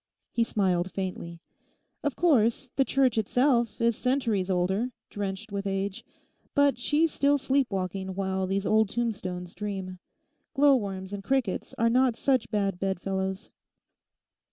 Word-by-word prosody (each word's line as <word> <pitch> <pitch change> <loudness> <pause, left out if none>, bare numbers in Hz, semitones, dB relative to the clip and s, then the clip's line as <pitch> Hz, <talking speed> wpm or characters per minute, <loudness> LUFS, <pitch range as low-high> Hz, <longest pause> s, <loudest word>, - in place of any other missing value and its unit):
He 235 - +2
smiled 185 -5 0
faintly. 170 -3 -5 0.6
'Of 290 -3 -1
course, 255 -6 +2
the 270 - +4
church 260 -4 +2
itself 235 0 +2
is 230 -1 +2
centuries 235 -8 0
older, 190 +6 +1 0.2
drenched 205 +1 -4
with 200 0 -3
age. 195 0 -2 0.5
But 285 -3 +3
she's 300 +5 +2
still 285 +1 +3
sleep 270 -1 +1
walking 190 0 -3
while 190 -1 -1
these 195 +1 -1
old 220 0 +3
tombstones 185 -7 -3
dream. 190 -2 -5 0.6
Glow 280 0 +6
worms 195 -4 -4
and 200 -1 -5
crickets 260 -5 -1
are 230 - +3
not 250 -1 +3
such 260 -2 +1
bad 195 -4 -1
bedfellows. 190 +1 -2
205 Hz, 135 wpm, -27 LUFS, 190-250 Hz, 0.6 s, Glow